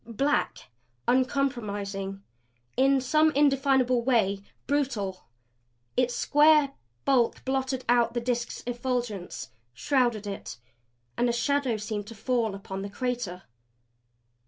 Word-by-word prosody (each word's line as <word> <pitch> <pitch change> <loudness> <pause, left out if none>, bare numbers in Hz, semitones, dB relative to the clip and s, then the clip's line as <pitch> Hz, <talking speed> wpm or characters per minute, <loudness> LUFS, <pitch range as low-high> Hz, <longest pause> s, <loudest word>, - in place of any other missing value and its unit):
Black, 240 - -1 0.4
uncompromising, 205 -7 -1 0.5
in 270 +1 +4
some 305 +5 +3
indefinable 270 -3 +3
way 215 -6 +2 0.2
BRUTAL, 240 - -1 0.7
its 250 -1 +1
square 295 -1 +5 0.3
bulk 250 -4 +2
blotted 265 -1 -1
out 240 -1 +3
the - - +2
Disk's 240 0 -2
effulgence; 240 -5 -3 0.2
shrouded 240 - +1
it. 195 -10 -6 0.6
And 245 - +2
a - - +3
shadow 250 0 +1
seemed 210 -1 -4
to 230 - -9
fall 225 -2 0
upon 195 -1 -6
the 200 - -5
crater. 235 -5 -3
245 Hz, 110 wpm, -27 LUFS, 210-265 Hz, 0.7 s, square